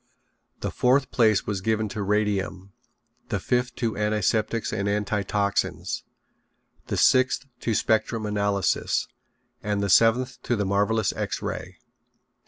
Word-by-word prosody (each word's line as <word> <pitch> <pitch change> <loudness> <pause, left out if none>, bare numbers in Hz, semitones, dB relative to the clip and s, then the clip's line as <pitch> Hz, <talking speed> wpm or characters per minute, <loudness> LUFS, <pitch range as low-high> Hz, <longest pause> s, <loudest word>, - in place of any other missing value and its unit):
The - - -2
fourth 130 +2 +2
place 110 -4 +3
was 100 -3 -2
given 110 +1 0
to 105 0 -4
Radium, 100 -2 -1 0.6
the 105 -4 -1
fifth 125 +5 -1
to 115 -2 -2
Antiseptics 105 +2 0
and 100 0 -1
Antitoxines, 105 -1 -1 0.9
the - - -2
sixth 130 0 +3
to 115 - -1
Spectrum 110 +1 +1
Analysis, 100 -2 0 0.5
and 105 -3 -1
the 100 - 0
seventh 120 +5 +3
to 120 - 0
the 105 -2 -1
marvelous 100 +2 +1
X - - -3
Ray. - - -5
105 Hz, 125 wpm, -25 LUFS, 100-115 Hz, 0.9 s, place